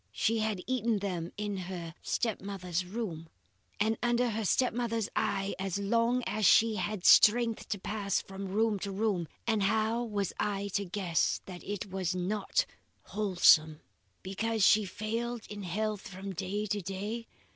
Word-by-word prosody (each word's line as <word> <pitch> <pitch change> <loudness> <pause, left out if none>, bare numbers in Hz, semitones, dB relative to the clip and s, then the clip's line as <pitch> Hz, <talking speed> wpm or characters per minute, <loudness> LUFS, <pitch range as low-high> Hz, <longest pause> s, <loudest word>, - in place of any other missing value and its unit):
She 225 +1 +1
had 215 -4 -1
eaten 235 -3 +1
them 180 -4 -3
in 205 -1 -3
her 175 -3 -6
step 225 -4 -1
mother's 180 -3 -3
room, 180 -6 -5 0.5
and 220 +2 +1
under 240 0 +2
her 220 0 -2
step 250 +5 +2
mother's 230 -2 -1
eye 195 +1 0
as 195 -1 -2
long 230 +5 +1
as 215 +1 -2
she 220 +3 +5
had 185 +1 -3
strength 230 +1 +6
to 205 - -1
pass 200 0 -1
from 195 0 -7
room 210 +1 +1
to 200 +1 -4
room, 195 -4 0 0.2
and 220 -3 +1
how 220 +3 +1
was 205 -5 -2
I 200 -1 -1
to 200 +1 -1
guess 180 -3 0
that 180 -2 -9
it 205 -1 -5
was 185 -1 -1
not 200 - 0 0.5
wholesome? 175 -6 +4 0.4
Because 220 +3 -1
she 210 +2 +6
failed 225 +4 -3
in 205 0 -6
health 210 +3 -2
from 195 +1 -7
day 195 +4 -2
to 205 0 -2
day? 205 +5 -4
205 Hz, 160 wpm, -31 LUFS, 190-220 Hz, 0.5 s, strength